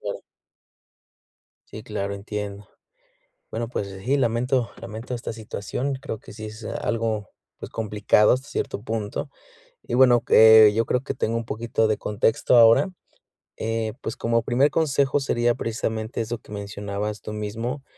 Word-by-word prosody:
claro. - - -5 1.5
Sí, 110 - -9
claro, 100 -3 -3
entiendo. 100 0 -6 0.8
Bueno, 115 0 -3
pues, 100 -4 -3 0.2
sí, 135 +4 +2
lamento 125 0 +1
lamento 115 +2 -6
esta 115 -1 -5
situación. 115 +4 -4
Creo 125 -6 -5
que - - -13
sí 110 +1 -7
es 110 +1 -9
algo, 110 -2 -2 0.3
pues, - - -8
complicado 105 -1 +3
hasta 130 +3 -2
cierto 100 - -3
punto. 110 +3 -3 0.6
Y, - - -6
bueno, 125 -2 +5
eh, 110 -1 +8
yo 115 +1 +2
creo 125 - 0
que - - -3
tengo 115 +1 -1
un 115 - -4
poquito 115 0 0
de 110 - +1
contexto 110 +3 +2
ahora. 115 +10 +6 0.7
Eh, 115 0 -2
pues, 115 - -5
como 115 0 +1
primer 130 +5 +2
consejo 140 -3 +1
sería 120 -3 +1
precisamente 110 0 -3
eso 115 +1 -3
que - - -19
mencionabas 100 0 -4
tú 105 - -7
mismo, 115 +6 -4
115 Hz, 150 wpm, -24 LUFS, 105-120 Hz, 1.5 s, eh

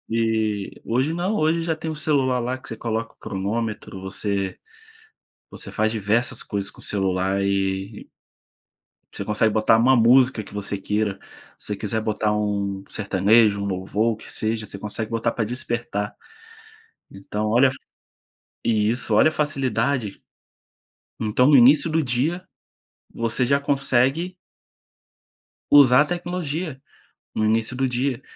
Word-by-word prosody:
E 110 -3 -1
hoje 130 +7 0
não, 180 +5 -1
hoje 165 -2 +1
já 165 -1 -1
tem 160 +1 -5
o 155 - -4
celular 135 -4 +1
lá 125 +2 -2
que 130 - -15
você 115 - -5
coloca 115 0 -3
o - - -42
cronômetro, 105 -1 -4
você 95 0 -2 1.0
você - - -8
faz 110 0 0
diversas 110 +3 0
coisas 100 -1 -4
com - - -17
o - - -14
celular 95 0 0
e 95 +1 -2 1.0
você - - -5
consegue 110 +1 +1
botar 110 +1 +4
uma 130 +3 +5
música 125 0 +4
que 100 - -14
você 100 0 -2
queira, 105 0 -1 0.4
se - - -7
você 105 - -2
quiser 110 +2 -2
botar 110 -1 0
um 100 -2 -2
sertanejo, 100 +1 +3
um - - -2
louvor 100 +4 0
o - - -5
que - - -10
seja, 110 0 -2
você 100 - -7
consegue 105 +2 -4
botar 115 0 0
para 115 - -1
despertar. 120 -3 -3 1.0
Então 105 +2 -4
olha 125 +4 +5
a - - -5
fa 130 - -9 0.9
isso 115 +1 +1
olha 130 - +6
a - - -2
facilidade. 135 -6 -1 1.0
Então 110 +4 +2
no 145 - +6
início 135 +7 +6
do 160 +1 +1
dia, 140 +9 -1 0.7
você 115 +2 0
já 140 +3 +2
consegue 140 +5 +1 1.3
usar 140 -2 +7
a - - 0
tecnologia, 175 -3 -4 0.5
no 110 - 0
início 110 +3 0
do 130 +1 0
dia. 125 +1 -1
115 Hz, 150 wpm, -23 LUFS, 105-130 Hz, 1.3 s, usar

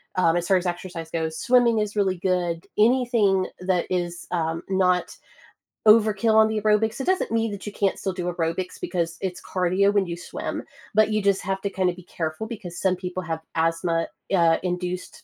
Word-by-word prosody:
um- 170 -2 +3
as 175 0 -2
far 190 - +4
as 180 - -3
exercise 175 -2 -5
goes- 160 -1 -2
swimming 245 -2 +4
is 210 0 -2
really 195 -3 +1
good, 175 -2 -1
anything 220 -4 +3
that 180 -1 0
is, 175 -1 -2
um, 165 -2 -1
not 180 -2 +1 0.7
overkill 215 0 +5
on 220 0 +6
the 220 -1 -1
aerobics, 215 +2 +2
it 265 - -2
doesn't 375 -8 +1
mean 225 0 +1
that 200 -1 -7
you 210 - -4
can't 200 -1 0
still 190 - -2
do 180 -1 -4
aerobics 170 +2 -2
because 170 -2 -2
it's 185 -2 -4
cardio 185 +2 +1
when 200 -2 +3
you 170 -1 -5
swim, 175 - -5 0.3
but 215 +1 +4
you 215 - +1
just 200 -1 +2
have 195 +1 -2
to 200 - -1
kinda 185 -2 0
be 180 +1 -13
careful 160 +3 -4
because 195 -7 -7
some 190 -1 +1
people 185 0 -5
have 160 -1 -3 0.2
asthma, 165 0 +1 0.3
uh, 165 -2 +4
induced 180 - -4
185 Hz, 195 wpm, -24 LUFS, 175-210 Hz, 0.7 s, on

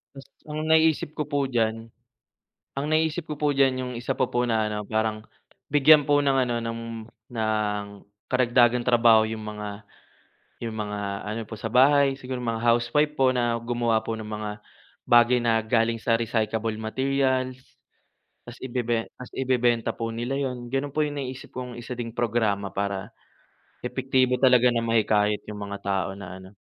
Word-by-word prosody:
Mas 135 0 -11 0.2
ang 150 0 -5
naiisip 160 -1 +3
ko 150 - -1
po 140 -2 -1
diyan, 115 -2 -1 0.9
ang 145 - -2
naisip 160 +1 0
ko 150 - -4
po 145 0 +1
diyan 135 -2 +3
'yong 125 0 -4
isa 125 - -2
pa - - +2
po 120 - -1
na 110 -1 +1
ano 105 - -3
parang, 110 0 0 0.5
bigyan 145 0 +6
po 145 0 +4
ng 140 - +3
ano, 120 - -1
ng 115 0 -4 0.5
ng 105 -2 -1 0.5
karagdagang 125 -1 +4
trabaho 115 -2 +5
'yong 110 -1 -5
mga, 105 -1 -5 0.9
'yong 115 - -3
mga 105 -1 -4 0.3
ano 110 +2 -3
po 110 - -5
sa 110 - -5
bahay, 135 +4 +4
siguro 130 -1 -6
mga 115 -2 -3
housewife 120 +6 +2
po, 130 -1 +4
na 120 -1 +1
gumawa 115 -1 0
po 115 - -2
ng 110 -1 -7
mga, 105 0 -4 0.5
bagay 120 +1 +5
na 115 -1 +2
galing 115 +1 +1
sa 115 0 +2
recyclable 110 -1 -1
materials, 130 +2 0 0.9
tapos 120 - -9
ibebe 120 -3 -2
tapos 125 - -12
ibebenta 125 -3 +1
po 115 0 -4
nila 120 +4 -2
'yon, 125 -3 -4
gano'n 135 +1 -2
po 155 - +2
'yong 145 -1 -4
naiisip 130 -1 -7
kong 125 -1 -6
isa 120 +1 -7
ding 115 -1 -5
programa 110 -4 0
para, 100 -1 -3 0.7
epektibo 130 0 +1
talaga 125 -2 +5
na 115 - +1
mahikayat 105 -2 +1
'yong 105 -1 -8
mga 100 0 -5
tao 95 -1 0
na 95 -1 -9
ano, 95 - -12
120 Hz, 165 wpm, -25 LUFS, 110-130 Hz, 0.9 s, bigyan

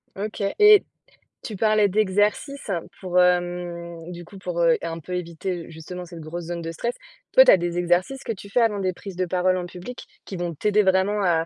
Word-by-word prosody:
OK 210 +1 -4 0.2
et 420 -1 +8 0.6
tu 215 - -6
parlais 215 0 +3
d'exercices 210 +5 0 0.3
pour, 180 -1 +2
hem, 175 -1 -1
du 175 -1 -9
coup, 195 +2 -13
pour, 180 -2 -4
heu, 165 -1 +4
un 165 0 -4
peu 180 +4 -8
éviter, 175 0 -4
justement, 165 +3 -8
cette 170 -1 -10
grosse 165 +2 -6
zone 170 0 -4
de 165 - -4
stress. 235 +9 -3 0.4
Toi, - - +8
tu - - +8
as - - +7
des 175 0 -3
exercices 175 +10 0
que - - -3
tu 200 0 -12
fais 245 - +1
avant 215 -3 +2
des 185 -1 0
prises 190 +1 -9
de 185 0 0
parole 185 +1 +1
en 180 -1 -3
public, 180 +8 -9 0.2
qui 195 - -7
vont 175 -1 -3
t'aider 210 +5 +2
vraiment 190 +2 +2
à 165 -2 +2
180 Hz, 210 wpm, -24 LUFS, 170-205 Hz, 0.6 s, et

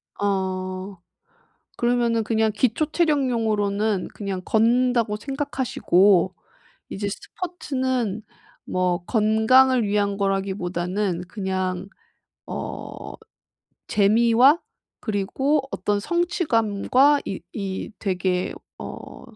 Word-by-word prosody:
아. 190 -1 -2 0.8
그러면은 240 -2 +1
그냥 220 0 +1
기초 250 +7 +1
체력용으로는 220 - +1
그냥 195 -3 -4
걷는다고 235 0 +2
생각하시고 205 - +2 0.6
이제 205 +1 -3
스포츠는 260 - -3 0.4
뭐 180 -1 -1
건강을 230 +3 +4
위한 200 -1 0
거라기보다는 190 -1 -1
그냥 190 -2 -3 0.6
어 - - -6 0.7
재미와 235 - +4 0.4
그리고 250 +8 0
어떤 205 -1 0
성취감과 280 - +2
이 195 - -4
이 195 0 -4
되게 185 -2 -1 0.3
어 - - -9
210 Hz, 200 characters per minute, -23 LUFS, 195-250 Hz, 0.8 s, 건강을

